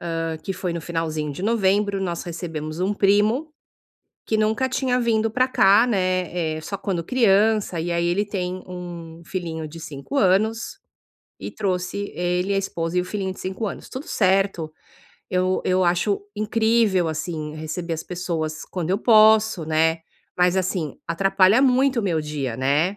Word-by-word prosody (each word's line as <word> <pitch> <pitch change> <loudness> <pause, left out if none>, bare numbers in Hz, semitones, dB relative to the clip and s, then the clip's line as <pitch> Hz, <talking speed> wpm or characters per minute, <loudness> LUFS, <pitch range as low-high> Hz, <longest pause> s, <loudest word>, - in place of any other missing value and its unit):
hã, 165 -1 -2
que 195 +4 -5
foi 180 -2 -3
no 170 - -3
finalzinho 160 -3 -3
de 145 - -7
novembro, 200 -2 +1
nós 175 -3 -2
recebemos 165 -2 -5
um 190 +3 +1
primo 210 +10 +2 0.7
que 220 - 0
nunca 215 +4 +1
tinha 255 -1 0
vindo 225 -2 +1
pra 255 +4 +2
cá, 205 -2 +5
né, 185 -6 0
eh, - - -7
só 180 +5 -5
quando 180 -5 -2
criança, 215 -4 +2
e 170 +2 -2
aí, 170 0 0
ele 190 +4 +1
tem 185 -2 -4
um 170 -2 -8
filhinho 165 -3 -4
de 160 +2 -10
5 150 - -7
anos 220 - +1 0.6
e - - -6
trouxe 195 0 -3
ele, 180 +2 0
a 195 - +2
esposa 175 -3 -2
e - - +4
o - - -3
filhinho 190 0 -3
de - - -12
5 190 +4 -3
anos, - - -6
tudo 260 +4 -7
certo, 190 -4 +1 0.6
eu 185 0 +1
eu 185 0 +2
acho 180 +4 +1
incrível, 215 -3 +2
assim, 155 -1 -4
receber 160 +2 -5
as 160 -1 -3
pessoas 165 -3 -4
quando 180 -2 -4
eu 195 - +2
posso, 220 -4 +5
né. 160 +1 +1 0.4
Mas, 180 +1 +3
assim, 180 -5 -2
atrapalha 195 +6 +3
muito 260 -1 +3
o - - -5
meu 170 -5 0
dia, 145 -6 -4
né? 145 +9 +1
185 Hz, 165 wpm, -23 LUFS, 165-210 Hz, 0.7 s, cá